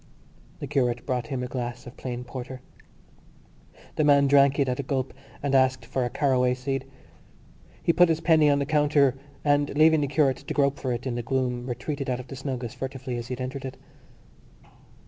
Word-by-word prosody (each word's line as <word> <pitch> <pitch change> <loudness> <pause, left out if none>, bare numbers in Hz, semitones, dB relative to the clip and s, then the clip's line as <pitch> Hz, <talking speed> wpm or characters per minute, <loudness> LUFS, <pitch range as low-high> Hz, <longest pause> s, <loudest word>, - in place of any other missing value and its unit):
The - - -6
curate 125 -4 0
brought 125 -3 -2
him 130 -2 -3
a - - -3
glass 120 -1 -5
of 120 - -10
plain 125 -1 -5
porter. 130 +1 -7 1.4
The 155 - +3
man 140 -1 +5
drank 140 0 +5
it 140 -2 +2
at 125 +1 -1
a - - +2
gulp 130 -1 -2 0.3
and 140 -1 0
asked 130 -2 +3
for 130 +2 -1
a 120 - -1
caraway 125 -1 +2
seed. 135 +1 -3 1.0
He 170 - +3
put 180 0 +5
his 160 -1 +1
penny 160 -3 +4
on 140 - +4
the 140 - 0
counter 145 -2 +3 0.3
and, 145 0 +3
leaving 155 0 +5
the 145 - 0
curate 140 -2 +2
to - - -6
grope 140 -1 +2
for 130 - -2
it 120 +1 -3
in 130 - -2
the 120 - -2
gloom, 125 0 -1
retreated 135 +3 -4
out 125 -1 -1
of 125 0 -10
the - - -6
snug 130 -2 -4
as 115 - -5
furtively 130 -1 -5
as 120 0 -5
he 130 - -4
had 125 - -6
entered 130 +1 -5
it. 130 -1 -6
130 Hz, 205 wpm, -26 LUFS, 125-140 Hz, 1.4 s, man